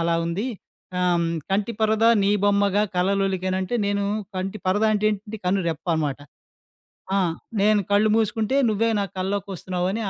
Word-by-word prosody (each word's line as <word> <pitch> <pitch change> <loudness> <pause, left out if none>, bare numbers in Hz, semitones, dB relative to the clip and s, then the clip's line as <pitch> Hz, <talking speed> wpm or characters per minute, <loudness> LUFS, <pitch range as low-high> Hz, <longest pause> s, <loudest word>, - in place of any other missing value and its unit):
అలా 170 0 +1
ఉంది. 180 +8 -2 0.5
ఆహ్, 180 - +2
హ్మ్, 170 0 +1 0.2
కంటి 200 +4 0
పరద 220 0 +2 0.2
నీ 195 - +3
బొమ్మగా 200 0 +3
కలలొలికేన 190 0 0
అంటే, 215 +6 -3
నేను 200 0 0 0.3
కంటి 190 +3 -3
పరద 200 +4 +2
అంటే 215 0 +1
ఏంటి? 210 +1 -5
కన్ను 185 +1 +1
రెప్ప 160 +1 -5
అనమాట. 145 -4 -1 1.0
ఆ! - - +3 0.4
నేను 210 +1 +4
కళ్ళు 205 +2 +4
మూసుకుంటే 225 +3 0
నువ్వే 225 +2 +1
నా - - 0
కల్లోకొస్తున్నావు 185 -2 -3
అని 225 +3 -2
200 Hz, 155 wpm, -23 LUFS, 185-210 Hz, 1.0 s, నేను